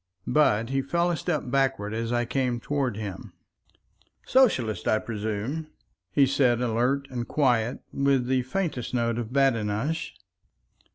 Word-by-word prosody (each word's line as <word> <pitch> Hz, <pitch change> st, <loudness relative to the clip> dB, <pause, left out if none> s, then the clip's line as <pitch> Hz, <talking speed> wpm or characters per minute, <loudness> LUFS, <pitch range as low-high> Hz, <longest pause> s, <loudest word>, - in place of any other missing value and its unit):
But 115 Hz, -7 st, +2 dB
he 135 Hz, 0 st, +1 dB
fell 170 Hz, +6 st, 0 dB
a -, -, 0 dB
step 160 Hz, -2 st, -2 dB
backward 130 Hz, -5 st, 0 dB
as 115 Hz, +1 st, -2 dB
I 120 Hz, 0 st, +1 dB
came 125 Hz, -1 st, -1 dB
toward 135 Hz, -4 st, -1 dB
him. 105 Hz, -4 st, -6 dB, 0.9 s
"Socialist, 180 Hz, -, +2 dB
I 110 Hz, -, +4 dB
presume?" 110 Hz, +8 st, -3 dB, 0.4 s
he 140 Hz, -, +5 dB
said, 130 Hz, -3 st, +2 dB
alert 125 Hz, +4 st, 0 dB
and 120 Hz, -2 st, -4 dB
quiet 125 Hz, -4 st, +1 dB
and 140 Hz, -, -1 dB
with 135 Hz, -3 st, +3 dB
the 130 Hz, 0 st, +1 dB
faintest 130 Hz, -3 st, -3 dB
note 115 Hz, -1 st, 0 dB
of 120 Hz, -1 st, -5 dB
badinage. 135 Hz, +3 st, 0 dB
125 Hz, 145 wpm, -26 LUFS, 115-140 Hz, 0.9 s, he